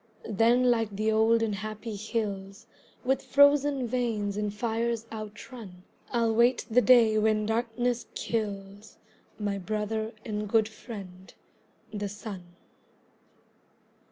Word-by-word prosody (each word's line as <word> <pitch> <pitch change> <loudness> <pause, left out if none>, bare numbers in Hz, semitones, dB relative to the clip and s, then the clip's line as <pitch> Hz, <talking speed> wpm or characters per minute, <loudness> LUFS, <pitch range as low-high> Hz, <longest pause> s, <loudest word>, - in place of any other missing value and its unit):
Then 240 +4 +4
like 225 -4 0
the 215 +2 +1
old 225 +1 +4
and 220 -2 0
happy 215 +2 -5
hills 205 -1 -4 0.4
With 265 +1 +1
frozen 285 -1 +4
veins 225 -5 -1
and 210 0 -1
fires 230 +1 -1
outrun, 210 -3 -9 0.3
I'll 230 -2 +1
wait 235 +3 +3
the 250 +3 +5
day 230 -4 +6
when 215 0 +2
darkness 235 +2 -1
kills 205 -1 -4 0.4
My 205 -2 -2
brother 215 +3 -2
and 210 -2 -3
good 220 0 +3
friend, 195 -5 -10 0.6
the 205 -1 -3
Sun. 205 -2 -7
220 Hz, 115 wpm, -28 LUFS, 205-235 Hz, 0.6 s, day